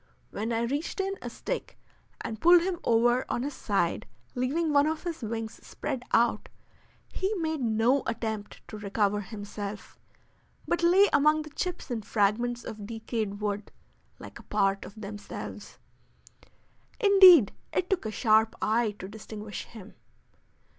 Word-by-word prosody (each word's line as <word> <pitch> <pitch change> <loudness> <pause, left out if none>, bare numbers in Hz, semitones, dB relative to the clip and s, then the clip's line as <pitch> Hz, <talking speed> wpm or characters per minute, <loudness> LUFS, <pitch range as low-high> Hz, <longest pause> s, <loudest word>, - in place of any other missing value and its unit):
When 220 +3 -3
I 230 0 0
reached 285 +10 -3
in 390 0 0
a - - -5
stick - - -5 0.4
and 220 0 -6
pulled 345 0 +7
him 360 -2 -2
over 240 +2 +3
on 240 - -1
his 285 +1 -3
side, 195 -9 -1 0.3
leaving 295 +6 0
one 285 +1 +5
of 315 0 -2
his 335 -4 -4
wings 225 0 -5
spread 265 -4 -4
out, 230 -2 +2 0.6
he 380 +2 -1
made 320 -5 -2
no 235 +4 +2
attempt 220 -2 -4
to 215 - -7
recover 205 0 0
himself, 205 0 -7 0.7
but 345 - 0
lay 365 +4 +6
among 305 +2 +4
the 305 - -11
chips 360 -3 -4
and 225 -3 -2
fragments 235 +4 0
of 215 -3 -7
decayed 220 -2 -4
wood, 205 0 -3 0.5
like - - -11
a - - -17
part 195 -1 +1
of 215 - -12
themselves. 205 0 -8 1.2
Indeed, 380 - +8 0.2
it 365 - 0
took 365 - -1
a - - -3
sharp 220 +1 +3
eye 220 -1 +1
to 190 - -7
distinguish 210 0 -8
him. 215 -3 -12
230 Hz, 145 wpm, -28 LUFS, 210-305 Hz, 1.2 s, Indeed